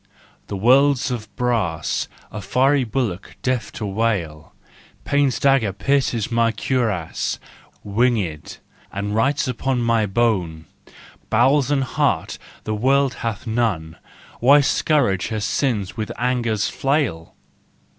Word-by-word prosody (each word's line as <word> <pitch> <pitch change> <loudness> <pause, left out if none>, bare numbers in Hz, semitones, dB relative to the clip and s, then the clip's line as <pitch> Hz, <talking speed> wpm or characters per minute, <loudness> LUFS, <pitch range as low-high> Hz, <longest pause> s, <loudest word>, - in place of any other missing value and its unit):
'' - - -33
The 100 - -4
world's 135 +5 +4
of 115 -3 -4
brass, 110 -10 -1 0.2
A 105 - -6
fiery 135 +6 +2
bullock, 115 -6 -3
deaf 130 -2 -1
to 110 - -5
wail: 95 -7 -2 0.5
Pain's 140 -4 +1
dagger 135 -7 +3
pierces 120 +1 0
my 115 0 +2
cuirass, 110 -7 -1 0.5
Wing6d, 105 -7 -1 0.3
and 100 +1 -3
writes 130 +7 +1
upon 125 0 -1
my 115 -2 +2
bone: 95 -7 0 0.3
" - - -22
Bowels 140 0 +3
and 140 -2 +2
heart 135 - -1 0.2
the 110 - -3
world 135 +4 +2
hath 115 -1 -3
none, 110 -9 -1 0.4
Why 140 +4 +6
scourge 135 - +1
her 110 -2 -3
sins 105 -2 -1
with 110 -2 -4
anger's 120 -3 0
flail 135 - -1
115 Hz, 125 wpm, -21 LUFS, 100-130 Hz, 0.5 s, Why